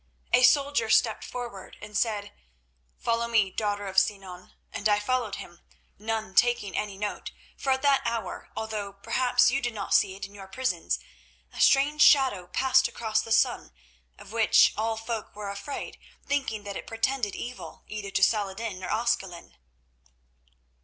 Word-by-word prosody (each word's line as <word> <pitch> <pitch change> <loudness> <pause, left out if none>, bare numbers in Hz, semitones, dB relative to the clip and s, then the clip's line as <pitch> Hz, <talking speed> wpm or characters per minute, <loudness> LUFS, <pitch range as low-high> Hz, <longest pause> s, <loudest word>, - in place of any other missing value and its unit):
A - - +6
soldier 275 -2 +4
stepped 220 0 +3
forward 240 -6 -7
and 210 0 -10
said, 210 -3 -1 0.7
'Follow 230 0 0
me, 220 -5 +2
daughter 205 -1 -2
of 190 0 +3
Sinan,' 190 -2 -4 0.2
and 215 - 0
I 205 - +4
followed 240 -1 -1
him, 175 0 -10 0.4
none 220 -1 -3
taking 240 -3 +2
any 205 -2 -3
note, 205 +1 -4 0.3
for 270 - -2
at 265 +1 +1
that 280 -1 +4
hour, 230 -1 -4
although 215 -3 -4
perhaps 245 +5 +2
you 275 +1 0
did 240 -2 -3
not 200 -2 -3
see 190 - +3
it 195 - -6
in 200 - -14
your 195 -1 -10
prisons, 255 +5 -1 0.6
a - - -4
strange 290 +2 +4
shadow 260 -13 +5
passed 265 +6 +3
across 220 -1 -1
the 225 - -9
sun, 145 - +2 0.4
of - - -13
which 225 -1 +5
all 220 +1 -1
folk 225 -2 -5
were 205 -1 -5
afraid, 200 +8 -7 0.3
thinking 265 -7 -2
that 200 -1 -6
it - - -7
portended 225 -1 -1
evil, 245 +1 -8
either 210 -2 -6
to 195 - 0
Saladin 205 -2 0
or - - -4
Ascalon. 205 -6 -2
220 Hz, 160 wpm, -27 LUFS, 200-245 Hz, 0.7 s, A